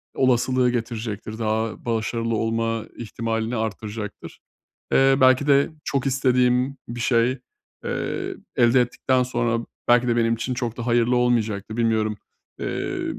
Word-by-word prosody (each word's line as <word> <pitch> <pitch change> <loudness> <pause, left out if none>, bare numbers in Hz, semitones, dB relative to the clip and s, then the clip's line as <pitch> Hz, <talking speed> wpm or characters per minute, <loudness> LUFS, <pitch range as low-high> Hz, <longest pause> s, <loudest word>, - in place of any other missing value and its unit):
olasılığı 130 0 +2
getirecektir, 110 -2 -4
daha 110 0 -2
başarılı 115 0 -1
olma 115 0 -1
ihtimalini 115 0 -3
arttıracaktır. 110 -1 -5 0.5
Eee, 135 0 +5
belki 130 +2 +5
de 140 +1 +4
çok 140 -1 -1
istediğim 125 0 +2
bir 120 +1 -6
şey, 120 +2 +2 0.5
eee, - - -3 0.2
elde 120 +1 +5
ettikten 125 +1 +1
sonra 120 -2 -1 0.2
belki 120 +1 +4
de 120 - +2
benim 115 -1 +2
için 125 +3 -3
çok 120 -2 -3
da 120 0 -5
hayırlı 120 +1 +3
olmayacaktı, 110 -4 0
bilmiyorum, 110 -2 +1 0.4
emm, - - -3
120 Hz, 125 wpm, -23 LUFS, 115-125 Hz, 0.5 s, Eee